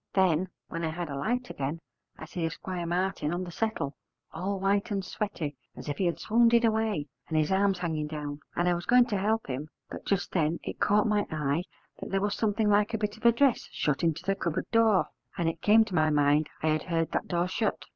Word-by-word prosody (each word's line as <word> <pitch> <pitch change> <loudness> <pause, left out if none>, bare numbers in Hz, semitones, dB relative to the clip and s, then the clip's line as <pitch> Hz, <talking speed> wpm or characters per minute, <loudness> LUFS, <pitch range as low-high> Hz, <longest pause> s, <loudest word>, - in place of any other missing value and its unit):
Then, 185 -2 +3 0.2
when 165 0 -5
I 160 - 0
had 170 0 -4
a - - -3
light 245 - -1
again, 140 +4 -3 0.4
I - - -8
see 170 +2 -5
Esquire 175 +1 -3
Martin 175 -3 0
on 175 +2 -2
the 175 - -7
settle, 195 -8 -2 0.4
all 190 +4 -2
white 200 +3 +1
and 195 -2 -2
sweaty 170 -8 -3 0.2
as - - -9
if 145 - -3
he 185 - +2
had 170 - -1
swounded 235 +1 +4
away, 220 -8 +1 0.2
and 160 - -1
his 155 +2 +2
arms 195 0 +3
hanging 160 -4 -2
down; 150 -1 -5 0.2
and 175 - +1
I 175 - +4
was 175 0 -4
going 245 0 +6
to 215 -4 -1
help 220 +3 +1
him; 135 +3 -4 0.2
but - - -7
just 200 -1 -1
then 165 -1 +1
it - - -6
caught 210 0 +3
my 210 -1 +1
eye 155 +2 -1 0.3
that - - -6
there 195 - +1
was 205 +1 0
something 215 0 +1
like 210 +2 +3
a - - 0
bit 210 -1 -2
of 225 +1 +1
a - - +8
dress 255 +1 +2
shut 150 -2 0
into 165 0 0
the 195 - +1
cupboard 170 -4 -2
door, 225 -4 +4 0.3
and 170 - 0
it 165 - -2
came 220 +1 +6
to 205 - -9
my 155 -2 +3
mind 145 0 +3
I 160 - +3
had 155 0 +1
heard 165 -1 0
that - - -1
door 175 0 0
shut. 215 +4 -1
180 Hz, 235 wpm, -28 LUFS, 160-210 Hz, 0.4 s, a